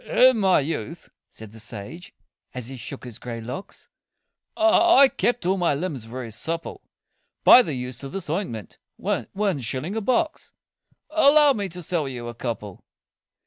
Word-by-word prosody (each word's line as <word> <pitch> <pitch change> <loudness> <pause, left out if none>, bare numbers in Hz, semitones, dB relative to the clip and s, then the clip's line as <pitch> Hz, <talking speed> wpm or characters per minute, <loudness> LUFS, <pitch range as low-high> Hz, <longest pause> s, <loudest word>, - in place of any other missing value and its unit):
"In 255 - +4
my 190 -6 +4
youth," 140 -7 -5 0.2
said 110 -2 -12
the 110 - -13
sage, 115 - -9 0.4
as 125 -1 -6
he 135 - -7
shook 130 +2 -8
his 120 -4 -9
grey 120 -1 -6
locks, 125 - -8 0.7
"I 330 -3 +6
kept 240 -6 -1
all 190 +2 +2
my 170 -5 +1
limbs 145 -7 -4
very 120 0 -7
supple 165 +9 -5 0.6
By 255 - +9
the 160 - -3
use 125 0 -5
of 135 - -6
this 195 -3 -5
ointment 150 - -4 0.2
one 195 -6 -2
shilling 130 - -3
a 225 - -1
box 255 +7 -1 0.6
Allow 295 -2 +6
me 200 -5 -3
to 180 +1 -8
sell 155 -4 -1
you 120 -2 -6
a - - -7
couple?" 110 -5 -6
155 Hz, 160 wpm, -24 LUFS, 120-200 Hz, 0.7 s, By